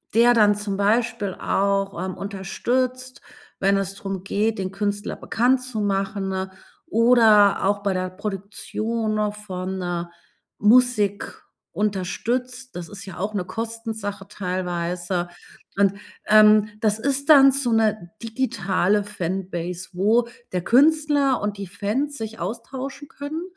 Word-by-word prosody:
der 240 +1 +6
dann 210 -3 +5
zum 205 -1 -3
Beispiel 215 0 +1
auch, 195 0 0
ähm, 190 - -4
unterstützt, 250 +7 -2 0.4
wenn 200 0 +3
es 195 0 -2
drum 195 -2 -5
geht, 215 +3 0
den 185 0 -3
Künstler 205 +1 -2
bekannt 250 +3 +1
zu 250 -4 -4
machen 195 -1 -1 0.4
oder 225 - +5
auch 200 +1 +1
bei 200 -1 +1
der 185 0 -2
Produktion 215 +3 -3
noch 210 -1 -1
von, 190 -2 -5
äh, 175 -1 -2 0.5
Musik 210 -2 +2 0.3
unterstützt. 245 +6 -2
Das 175 -1 -6
ist 200 -1 -7
ja 190 -3 -9
auch 205 +3 -2
'ne 180 - -1
Kostensache 225 -3 -5
teilweise. 180 -2 -3 0.5
Und, 200 -1 +4 0.3
ähm, 215 0 +6
das 215 0 +1
ist 280 +3 -1
dann 275 -3 +9
so 265 -3 0
'ne 215 -5 +1
digitale 205 -4 0
Fanbase, 180 -2 -4
wo 220 +6 +2 0.3
der 180 -1 -1
Künstler 285 - +3
und 205 0 -2
die 200 - -5
Fans 220 +10 -2
sich 225 0 -6
austauschen 255 +9 -6
können, 285 +4 -6
205 Hz, 130 wpm, -23 LUFS, 195-235 Hz, 0.5 s, dann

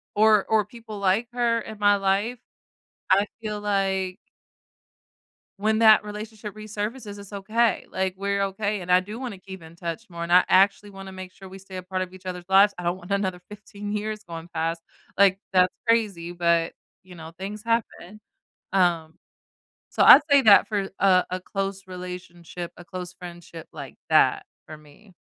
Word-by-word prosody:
or 215 -1 +4
or 220 -1 +3
people 220 -2 -10
like 200 +4 +1
her 235 -1 +1
in 215 -1 -10
my 205 0 +5
life, 200 +5 0 0.7
I 200 +2 +5 0.2
feel 210 -1 -4
like 195 -2 -1 1.4
when 215 +1 +1
that 220 -2 +6
relationship 210 0 -8
resurfaces, 215 0 -6
it's 200 0 -11
okay. 215 +3 0
Like, 190 -1 -2
we're 200 0 -1
okay, 200 +1 -2
and 180 +1 -1
I 180 - +6
do 210 +5 -8
wanna 245 -7 -6
keep 190 -1 -11
in 160 +1 -13
touch 170 +5 -5
more. 170 -1 -7
And 170 +1 -3
I 180 - +7
actually 200 +2 +3
wanna 195 -1 -10
make 185 -1 -9
sure 190 0 -13
we 190 +1 -11
stay 195 0 -11
a - - -6
part 185 +1 -3
of 185 0 -6
each 185 0 -14
other's 180 -1 -5
lives. 195 +2 +5
I - - -5
don't 175 +1 -1
want 180 +1 -13
another 190 -3 -1
15 205 0 -9
years 215 0 -3
going 165 -2 -9
past. 165 +1 -2 0.4
Like, 195 -1 +5 0.2
that's 180 0 +4 0.2
crazy, 200 -7 +1
but, 170 -1 +1 0.3
you 185 -1 -13
know, 165 -1 -10
things 205 +2 -6
happen. 220 -3 -2 0.5
Um, 170 -4 +1 0.8
so - - +2
I'd - - +11
say 280 -1 +6
that 210 -4 +7
for 200 -3 -1
a 185 -2 +4
a 185 0 -3
close 195 0 -4
relationship, 180 -1 -8
a 175 - -12
close 180 -1 -7
friendship 175 -2 -11
like 140 -5 -9
that - - +3 0.2
for 155 - -9
me. 155 +7 -20
195 Hz, 180 wpm, -25 LUFS, 180-210 Hz, 1.4 s, I'd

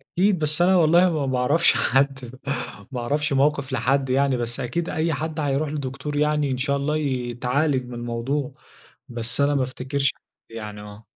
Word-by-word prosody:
أكيد، 190 0 +3
بس 155 +2 +1
أنا 185 +2 +5
والله 170 +2 +5
ما 155 -4 -1
باعرفش 130 +6 +3
حد، 135 -2 0 0.5
ما 125 - -3
أعرفش 145 +4 0
موقف 140 0 +1
لحد 135 +2 +1
يعني. 135 0 +2
بس 120 +1 -3
أكيد 150 +7 -2
أي 160 +1 0
حد 155 +2 -3
هيروح 145 0 0
لدكتور 140 0 -4
يعني 150 -1 +1
إن 130 - -1
شاء 140 +2 0
الله 150 +2 0
ي 130 -5 -2
يتعالج 130 +2 0
من 125 - -9
الموضوع. 120 +4 -3 0.6
بس 120 +2 -1
أنا 145 0 +3
ما 135 - +2
أفتكرش 130 +1 -1 0.4
يعني 105 -2 -7
آه. 105 +1 -12
140 Hz, 170 wpm, -23 LUFS, 125-150 Hz, 0.6 s, أنا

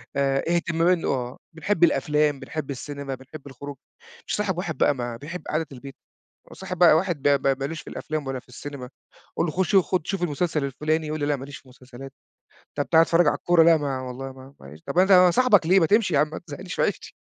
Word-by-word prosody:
آآ 135 -1 +1
اهتمام 170 0 0
إن 180 -2 +2
آه. 125 -2 -2 0.2
بنحب 175 +2 -1
الأفلام، 150 -3 +2
بنحب 145 +1 -6
السينما، 140 0 -6
بنحب 135 +3 -12
الخروج. 140 +1 -9 0.5
مش - - -3
هاصاحب 200 -4 -1
واحد 175 -3 -4
بقى 145 - +3
ما 120 -2 -5
بيحب 170 +7 -8
قعدة 155 +1 -1
البيت، 135 +1 -10 0.5
وأصاحب 185 -1 -7
بقى 170 -2 +7
واحد 170 -4 -2
ب 140 -1 +3
ب 135 -1 +1
ما 135 - -2
لوش 160 +2 -5
في - - -11
الأفلام 155 -2 -5
ولا 135 -1 -3
في 125 - -24
السينما. 130 0 -8 0.5
أقول - - +2
له 155 - -2
خُش 190 +3 0
خُد 185 -3 +2
شوف 195 -3 -2
المسلسل 160 -1 -1
الفُلاني. 155 +3 -1
يقول 155 +1 -3
لي 145 - -1
لأ 145 0 +1
ما 135 0 -8
ليش 140 -1 -9
في 130 - -20
مسلسلات. 130 +1 -12 0.7
طب 145 - -1
تعالَ 160 -1 +6
اتفرّج 165 0 +3
على - - +3
الكورة. 175 -2 +3
لأ 165 0 +6
ما 140 -3 -3
والله 130 +1 -7
ما 135 +1 -14
معلش. 70 +3 -13
طب 175 - -3
أنا 185 -1 +6
صاحبك 210 -4 +4
ليه؟ 190 +3 +5
ما 165 - +3
تمشي 205 -2 +2
يا 140 - +4
عم 150 - +1
ما - - -7
تزهّقنيش 180 +4 -7
في - - 0
عيشتي. - - -2
150 Hz, 230 wpm, -24 LUFS, 135-170 Hz, 0.7 s, بقى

